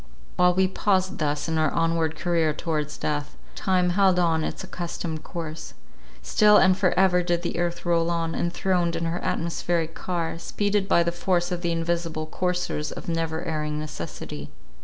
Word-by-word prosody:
While 180 0 +4
we 190 0 +4
paused 190 -1 0
thus 145 0 -1
in 160 -1 0
our 155 -1 +3
onward 165 -1 0
career 165 -2 +1
towards 150 -1 -3
death, 145 -1 -3 0.2
time 185 -3 +1
held 190 0 +4
on 165 -3 +2
its - - -4
accustomed 170 -3 -5
course. 160 -2 -6 0.5
Still 210 - +5
and 185 -1 +5
for 185 -2 +2
ever 180 -1 +4
did 175 -1 0
the 170 - -2
earth 175 0 -2
roll 170 -1 +2
on, 165 -1 -1
enthroned 175 0 0
in 165 0 -2
her 165 +2 -1
atmospheric 165 -1 -1
car, 170 -2 -3
speeded 205 +2 0
by 170 - +4
the 170 - 0
force 175 0 0
of 175 -1 -2
the 170 -1 0
invisible 165 -1 -1
coursers 180 -2 -2
of - - -8
never 165 0 -2
erring 150 -2 -2
necessity. 110 - -6
170 Hz, 170 wpm, -25 LUFS, 160-180 Hz, 0.5 s, Still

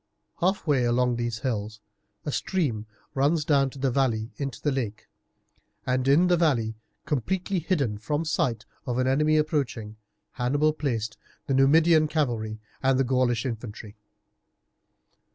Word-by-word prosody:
Half 190 +2 +1
way 140 -6 +2
along 120 0 +2
these 120 -1 -3
hills 110 -4 -3 0.5
a - - -1
stream 130 - -1 0.3
runs 145 +3 +2
down 140 -3 +3
a 135 - +2
valley 120 -4 0
into 135 -5 -4
the 145 - 0
lake, 115 -6 -3 0.8
and 130 +1 0
in 145 +6 +5
the 180 -1 +4
valley, 125 -10 +2 0.3
completely 180 - -1
hidden 140 - -1
from 145 +8 -1
the - - -8
sight 125 -10 0 0.2
of 125 -1 -1
an 130 - +2
enemy 150 +4 +3
approaching, 130 -8 -1 0.3
Hannibal 145 +5 +1
placed 115 -8 -2 0.3
the 135 - -1
Numidian 155 +4 +5
cavalry 115 -8 -1 0.2
and 135 -1 +3
the - - +4
Gaulish 125 -2 +1
infantry. 110 -3 -6
130 Hz, 140 wpm, -26 LUFS, 115-150 Hz, 0.8 s, in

